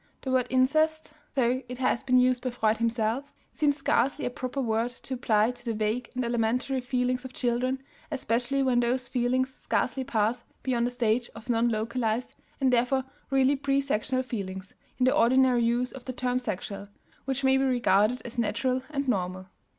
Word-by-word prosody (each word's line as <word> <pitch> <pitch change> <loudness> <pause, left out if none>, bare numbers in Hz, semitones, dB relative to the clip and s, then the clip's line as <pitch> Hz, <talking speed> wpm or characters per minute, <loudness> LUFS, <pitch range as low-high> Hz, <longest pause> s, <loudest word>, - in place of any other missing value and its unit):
The 265 - -2
word 255 -1 +2
"incest," 310 +4 +2 0.2
though 255 -1 +2
it 250 - -5
has 255 -2 +1
been 255 -1 +3
used 250 0 +3
by 255 - -1
Freud 220 -2 +1
himself, 230 +4 -1 0.2
seems 290 -2 +2
scarcely 280 -1 +1
a 245 - -1
proper 255 +2 -4
word 230 -1 0
to 250 +2 -7
apply 225 -3 +2
to 245 - -13
the 230 -2 -2
vague 220 +3 -1
and 255 -1 -1
elementary 240 +3 0
feelings 250 0 -1
of 260 -1 -8
children, 255 +2 -1 0.3
especially 260 -1 0
when 255 -2 +3
those 245 +1 0
feelings 255 +1 0
scarcely 265 - -1
pass 230 0 0 0.2
beyond 240 -2 +1
a - - -1
stage 240 -1 0
of 230 +2 -11
non 235 +1 +2
localized 230 +1 -1 0.2
and 260 -2 +2
therefore 250 +2 +2 0.3
really 270 +1 +3
presexual 275 -2 0
feelings 190 -5 -5 0.2
(in 255 - +2
the 255 - +3
ordinary 250 0 +4
use 240 +2 +1
of 260 -2 -11
the 255 - -4
term 250 0 0
"sexual") 200 -3 -5 0.4
which 270 0 -2
may 265 0 +4
be 270 - +2
regarded 245 -2 +2
as 240 0 -5
natural 250 +3 0
and 280 -2 -2
normal. 185 -5 -1
250 Hz, 180 wpm, -28 LUFS, 230-260 Hz, 0.4 s, ordinary